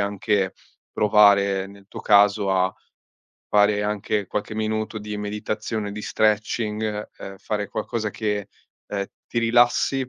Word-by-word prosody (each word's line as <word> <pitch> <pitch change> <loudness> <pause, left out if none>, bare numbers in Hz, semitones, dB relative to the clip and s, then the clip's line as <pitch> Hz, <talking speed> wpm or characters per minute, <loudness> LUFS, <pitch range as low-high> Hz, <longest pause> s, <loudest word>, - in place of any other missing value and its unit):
anche 100 -1 0 0.4
provare 100 -2 +4
nel 100 0 -15
tuo - - -9
caso 100 -1 +4
a 95 -1 +2 0.8
fare 105 0 +3
anche 105 -1 -1
qualche 105 +1 -3
minuto 110 0 -2
di 105 0 -5
meditazione, 105 +1 -3
di 105 +1 -7
stretching, 105 0 0
ehm, 95 0 -9
fare 105 +1 -3
qualcosa 110 -2 -3
che, 105 -1 -2 0.4
ehm, 100 -1 -3 0.2
ti 120 - -2
rilassi 120 +3 +2
105 Hz, 125 wpm, -23 LUFS, 100-110 Hz, 0.8 s, provare